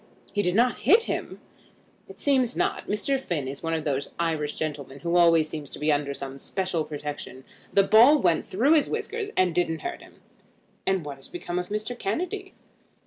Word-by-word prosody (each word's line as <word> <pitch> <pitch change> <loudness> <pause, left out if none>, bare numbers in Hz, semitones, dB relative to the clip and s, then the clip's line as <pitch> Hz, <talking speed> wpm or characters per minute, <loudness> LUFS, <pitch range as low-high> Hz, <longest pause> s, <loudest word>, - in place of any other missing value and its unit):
"He 205 - +2
did 180 -2 0
not 240 +1 +3
hit 415 - +5
him?" - - -4 0.7
"It - - -13
seems 260 -4 +2
not. - - -1
Mr. 265 +7 0
Finn 170 - -3
is 140 +1 -6
one 165 0 -1
of 160 - -2
those 140 -2 -1
Irish 160 -3 -1
gentlemen 145 -3 -5
who 170 0 -1
always 165 -2 +5
seem 155 -1 -6
to - - -9
be 150 +1 +1
under 145 -1 0
some 135 0 -7
special 185 -2 -2
protection. 145 -3 -7 0.3
The 195 - +5
ball 235 +9 +7
went 175 - +2
through 255 +11 +2
his 305 -3 +3
whiskers 445 -1 -3
and 185 -2 +3
didn't 165 -1 0
hurt 355 0 -4
him." - - -16 0.7
"And 190 -4 +1
what 140 -2 -6
has 135 - -8
become 175 0 -4
of 180 - -5
Mr. 215 +4 -3
Kennedy?" 365 - -3
175 Hz, 195 wpm, -26 LUFS, 150-245 Hz, 0.7 s, ball